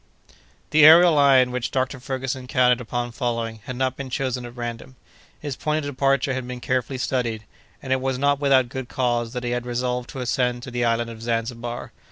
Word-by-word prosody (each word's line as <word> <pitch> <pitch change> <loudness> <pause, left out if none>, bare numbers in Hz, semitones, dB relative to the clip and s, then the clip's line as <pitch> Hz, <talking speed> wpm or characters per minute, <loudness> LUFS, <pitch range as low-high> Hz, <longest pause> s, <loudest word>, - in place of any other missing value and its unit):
The 155 - +5
aërial 165 +3 +9
line 135 -4 +5
which 125 -2 -2
Dr. 130 +1 -2
Ferguson 130 0 -4
counted 125 -1 +3
upon 120 +1 -3
following 115 -3 -3
had 125 - -5
not 130 0 -1
been 135 -1 -6
chosen 125 -1 -2
at 120 - -13
random; 120 +2 -6 0.4
his 145 -3 -5
point 155 0 -1
of 145 - -3
departure 135 0 +1
had 130 -1 -4
been 125 0 -6
carefully 130 0 -1
studied, 120 -4 -2 0.4
and 130 -1 0
it 130 - 0
was 130 -1 -1
not 140 +1 +2
without 135 -3 +3
good 130 0 -6
cause 120 -2 -1
that 125 -1 -4
he 120 - -2
had 120 0 -2
resolved 125 0 -2
to 135 - -7
ascend 125 0 -1
at 125 - -9
the 120 0 0
island 115 0 0
of 110 -1 -11
Zanzibar. 115 +1 -3
125 Hz, 205 wpm, -23 LUFS, 120-135 Hz, 0.4 s, aërial